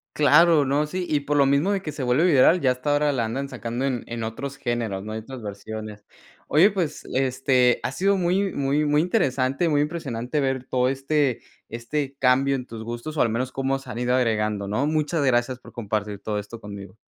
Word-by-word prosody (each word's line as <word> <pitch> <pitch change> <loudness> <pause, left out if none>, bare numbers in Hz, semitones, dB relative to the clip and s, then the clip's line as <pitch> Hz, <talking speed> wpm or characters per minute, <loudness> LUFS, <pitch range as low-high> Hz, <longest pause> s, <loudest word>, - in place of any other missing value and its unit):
Claro, 150 +1 +5
no, 145 +3 +1
sí, 180 +2 -3
y 150 -2 +1
por 145 +1 -1
lo 140 - +5
mismo 140 +8 +2
de 195 -2 0
que 155 - -5
se 145 -2 -5
vuelve 125 +7 +2
viral, 165 +2 +5
ya 130 -2 +3
hasta 125 +4 -2
ahora 145 0 +2
la 120 -4 0
andan 135 +5 -3
sacando 120 0 -4
en 125 -4 -2
en 115 -1 -5
otros 135 +5 -5
géneros, 115 -7 -2
¿no?, 110 +1 -6
en 110 0 -5
otras 130 0 -9
versiones. 105 +1 -7 0.4
Oye, 185 +7 +5
pues, 175 -6 -3
este, 130 -1 +2
ha - - -1
sido 195 +6 +1
muy 185 +2 +1
muy 140 +2 0
muy 150 +1 +3
interesante, 150 - +1
muy 145 -1 +2
impresionante 150 -4 -3
ver 130 -1 -1
todo 125 0 +1
este 135 0 0 0.3
este 135 +5 -4
cambio 135 +1 +3
en 125 - -4
tus 110 -2 -8
gustos 120 +7 -6
o - - +3
al 120 - +3
menos 125 +4 -2
cómo 135 0 -1
se 135 - -10
han 115 - -5
ido 125 +1 +1
agregando, 105 -4 0
¿no? 130 +9 0
Muchas 155 0 0
gracias 125 -1 +1
por - - -14
compartir 105 -3 -3
todo 105 -1 -3
esto 105 +3 -9
conmigo. 100 -1 -10
130 Hz, 215 wpm, -24 LUFS, 115-150 Hz, 0.4 s, Claro